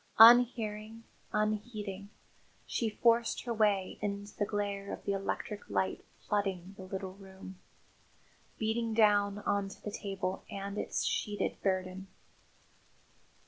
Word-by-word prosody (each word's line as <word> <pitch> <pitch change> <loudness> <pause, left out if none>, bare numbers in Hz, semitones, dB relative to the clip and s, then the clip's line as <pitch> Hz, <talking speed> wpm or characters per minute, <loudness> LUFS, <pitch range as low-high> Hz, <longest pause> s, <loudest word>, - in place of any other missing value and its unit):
Unhearing, 225 -1 +6 0.3
unheeding, 210 -2 -2 0.6
she 230 - -1
forced 230 +2 +2
her 240 - -2
way 205 -4 +1
into 205 0 -4
the 205 - 0
glare 200 -1 -2
of - - -7
electric 200 +1 -3
light 95 -2 0 0.2
flooding 195 -3 -1
the 195 - -10
little 190 0 -5
room 190 -1 -12 1.0
beating 225 +1 0
down 205 -2 +4
on 200 -1 +1
to - - -12
the 210 - -4
table 195 -2 -3
and 200 +1 -4
its - - -1
sheeted 205 -1 -1
burden. 185 0 -1
205 Hz, 115 wpm, -32 LUFS, 195-215 Hz, 1.0 s, Unhearing